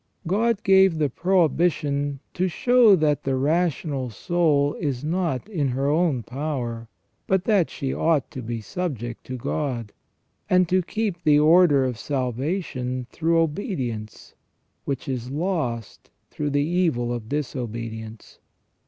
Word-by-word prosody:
God 210 +5 +1
gave 190 -3 +5
the 150 -2 +1
prohibition 150 -5 +1
to 185 +1 0
show 235 +3 +5
that 150 -4 +1
the 135 -2 -1
rational 145 -2 0
soul 145 - +1
is 140 -5 -2
not 165 -2 -1
in 165 -10 -1
her 135 +2 -1
own 155 -6 +1
power, 125 -4 -4 0.4
but 190 -1 +2
that 200 -6 +2
she 135 -1 -3
ought 160 -5 +1
to 135 -4 -6
be 115 -1 -4
subject 120 - -4
to 130 - -5
God, 120 -4 -3 0.6
and 185 -1 +4
to 185 +2 +2
keep 200 -1 -3
the 150 -1 +5
order 155 -3 +5
of 125 -4 -3
salvation 130 - -2
through 165 +1 +1
obedience, 145 - -3 0.5
which 140 -3 -3
is 125 -2 -3
lost 145 - -3 0.2
through 150 -1 -2
the 145 0 +1
evil 160 -9 0
of 115 -2 -6
disobedience. 115 -6 -5
145 Hz, 135 wpm, -24 LUFS, 125-175 Hz, 0.6 s, gave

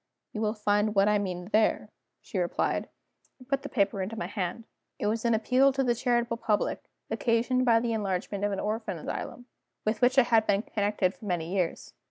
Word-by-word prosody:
"You 215 - -3
will 215 0 0
find 210 0 +1
what 195 +1 +4
I 210 0 +3
mean 180 -2 -4
there," 215 -1 +2 0.3
she 190 - -4
replied 175 -1 -1 0.5
and 255 - -16
put 275 0 0
the - - -7
paper 200 -4 +1
into 210 +4 -4
my - - -2
hand. 190 +2 -3 0.3
It - - -3
was 220 +2 0
an 235 -1 +4
appeal 255 +5 +4
to 270 0 +1
the 245 -2 +2
charitable 240 -1 0
public, 210 -2 -1 0.3
occasioned 245 +2 +1
by 230 -2 +5
the 230 0 -1
enlargement 200 -1 -2
of 205 - +1
an 195 - -2
orphan 210 -3 -2
asylum, 245 +9 -6 0.4
with 215 +3 0
which 255 +2 +4
I 265 - +8
had 225 -2 +3
been 205 +1 +2
connected 205 -4 0
for 215 - -13
many 175 -2 -2
years. 180 -4 -2
215 Hz, 205 wpm, -28 LUFS, 200-235 Hz, 0.5 s, I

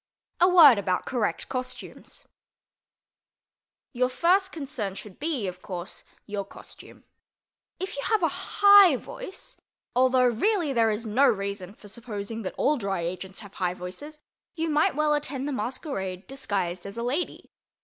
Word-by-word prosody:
A 355 - +6
WORD 305 - +8
ABOUT 185 -2 -1
CORRECT 235 -5 -2
COSTUMES 255 -1 -7 1.7
Your 250 0 +1
first 375 +8 +2
concern 265 - -5
should 200 -2 -10
be, 295 -8 -2
of 180 0 -7
course, 180 0 -7 0.2
your 205 -1 -3
costume. - - -14 0.8
If 380 +2 -4
you 280 - -4
have 435 -4 +1
a - - +5
high 400 +1 +6
voice 385 - -9 0.3
(although 255 0 +4
really 300 - +1
there 230 -2 +3
is 215 +2 -2
no 230 +6 +3
reason 200 -1 -2
for 210 - -15
supposing 220 0 -6
that 190 - -5
all 300 +1 +2
Dry 195 -6 -2
Agents 185 +4 -5
have 200 -2 -12
high 180 -2 -1
voices), 240 +13 -9 0.4
you 325 -1 -1
might 295 -2 +2
well 300 0 +2
attend 280 -2 -2
the - - -2
masquerade 215 - -4
disguised 195 -9 -3
as 200 +3 -8
a 235 - -2
lady. 280 +9 -3
245 Hz, 150 wpm, -26 LUFS, 200-300 Hz, 1.7 s, WORD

